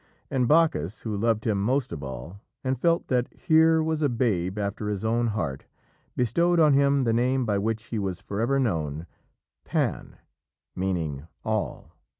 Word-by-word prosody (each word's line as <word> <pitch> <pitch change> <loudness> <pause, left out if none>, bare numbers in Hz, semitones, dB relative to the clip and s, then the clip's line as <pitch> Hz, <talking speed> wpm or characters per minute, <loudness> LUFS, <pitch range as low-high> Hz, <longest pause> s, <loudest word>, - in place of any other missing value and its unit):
And 130 -3 +1
Bacchus, 155 - +2
who 110 -2 -3
loved 110 +1 0
him 105 -4 +1
most 130 +5 0
of 75 - -6
all, 70 +8 -8 0.2
and 130 -1 -1
felt 170 0 +2
that 125 -1 +1
here 160 -1 +4
was 160 -1 -1
a 145 - +3
babe 105 -6 0
after 105 +1 -2
his 105 0 -3
own 120 +1 +1
heart, 85 -12 -3 0.5
bestowed 170 +9 +2
on 155 -3 +6
him 140 0 +3
the 115 -2 +1
name 125 +2 +1
by 105 -3 +1
which 110 +1 -1
he 115 -1 -4
was 95 -3 -3
forever 115 +8 -1
known 80 - -1 0.6
Pan, - - -2 0.6
meaning 80 -6 -2 0.2
All. - - -2
115 Hz, 160 wpm, -26 LUFS, 100-135 Hz, 0.6 s, on